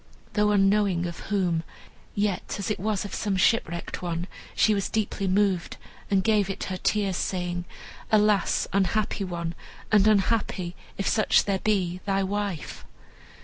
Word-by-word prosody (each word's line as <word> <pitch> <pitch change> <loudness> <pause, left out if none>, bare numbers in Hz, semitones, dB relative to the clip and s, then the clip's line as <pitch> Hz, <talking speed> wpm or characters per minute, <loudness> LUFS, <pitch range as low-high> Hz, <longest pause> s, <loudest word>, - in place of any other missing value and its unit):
Though 210 -1 +3
unknowing 195 -3 +3
of 170 -1 -5
whom, 180 -5 +1 0.5
yet, 205 -2 -1
as 200 +2 -2
it - - -2
was 205 0 -1
of 205 - -7
some 200 -3 -1
shipwrecked 175 -4 +1
one, 175 -1 -2 0.3
she 215 - +4
was 200 -1 -1
deeply 205 -2 -1
moved, 190 -2 +1 0.3
and 195 -2 +2
gave 210 -2 +2
it 195 - -4
her 185 - -3
tears, 195 -2 0
saying, 175 -1 -2 0.5
"Alas! 210 -2 +3
unhappy 200 +2 +1
one, 170 -2 -3 0.4
and 210 -1 +5
unhappy, 200 -4 +1 0.2
if 195 - -1
such 215 - +3
there 195 -2 0
be, 185 -4 0
thy 195 0 +2
wife!" 200 -3 -3
195 Hz, 145 wpm, -26 LUFS, 180-210 Hz, 0.5 s, and